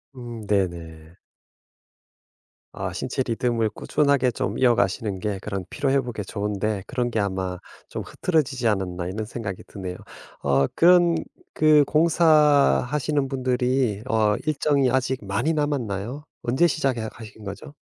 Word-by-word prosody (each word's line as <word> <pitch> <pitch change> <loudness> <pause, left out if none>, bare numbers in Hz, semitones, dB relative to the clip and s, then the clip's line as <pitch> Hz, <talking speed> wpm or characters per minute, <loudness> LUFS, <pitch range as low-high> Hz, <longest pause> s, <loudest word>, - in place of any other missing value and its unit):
음 120 -3 -8
네네. 85 -4 -2 1.6
아 - - -4
신체 130 - -2
리듬을 115 -1 0
꾸준하게 140 0 +1
좀 - - -3
이어가시는 105 -5 +2
게 105 -2 -3
그런 100 -3 -4
피로 140 -2 -1
회복에 125 -6 0
좋은데 105 0 -2
그런 125 +1 -1
게 110 - -1
아마 95 -2 -2 0.3
좀 - - -5
흐트러지지 135 -8 0
않았나 90 -4 -1
이런 105 +4 -4
생각이 110 -5 -6
드네요. 95 -2 -7 0.5
어 70 -1 +3
그런 175 -1 +5 0.4
그 155 -1 +6
공사하시는 150 - +3
분들이 125 -4 0
어 110 -2 +2
일정이 140 -3 +2
아직 130 -4 -1
많이 100 +12 0
남았나요? 135 -3 -2 0.2
언제 130 +8 +3
시작해 130 -8 -1
하신 110 -1 -12
거죠? 100 +9 -8
120 Hz, 285 characters per minute, -24 LUFS, 100-140 Hz, 1.6 s, 그